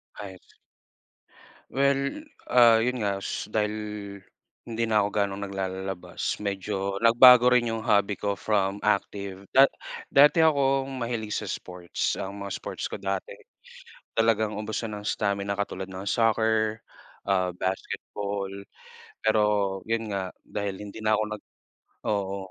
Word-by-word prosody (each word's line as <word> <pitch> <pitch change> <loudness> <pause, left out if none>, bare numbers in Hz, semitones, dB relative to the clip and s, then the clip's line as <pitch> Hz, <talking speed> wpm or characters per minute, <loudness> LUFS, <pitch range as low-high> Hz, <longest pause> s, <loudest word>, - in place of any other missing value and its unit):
Ayos. 95 -3 -11 1.2
Well 140 - +1 0.2
ah, 120 -2 +6
yun 125 +1 0
nga 100 -1 0 0.3
dahil, 105 0 0 1.0
hindi 115 0 -1
na 110 -2 +3
'ko 100 - 0
gaanong 100 -1 -1
naglalalabas 95 -1 -4
medyo 100 -1 -3
nagbago 125 +1 +8
rin 120 -2 +3
yung 110 - -3
hobby 105 -3 +2
ko 100 -1 -1
from 100 -2 0
active 100 -1 -1
da 135 +1 +8 0.5
dati 150 +3 +6
akong 135 -2 +2
mahilig 115 -3 -3
sa - - -3
sports, 90 -1 -3
ang 100 +1 -6
mga 100 -1 -5
sports - - -5
ko - - -4
dati, 95 -1 -3 0.8
talagang 110 -2 +2
ubusan 110 0 -4
ng 105 - -8
stamina 100 -1 -1
katulad 95 -2 -4
ng 95 +2 -5
soccer, 110 -1 +2 0.5
ah, 95 -2 +2
basketball. 100 +2 -4 0.7
Pero 110 0 +3 0.4
yun 115 -1 -2
nga, 95 -2 -3
dahil 100 -1 -4
hindi 105 +1 -9
na 110 - +4
ako 110 - +1
nag - - -25 0.7
oo. 100 -2 -1
105 Hz, 130 wpm, -26 LUFS, 100-115 Hz, 1.2 s, nagbago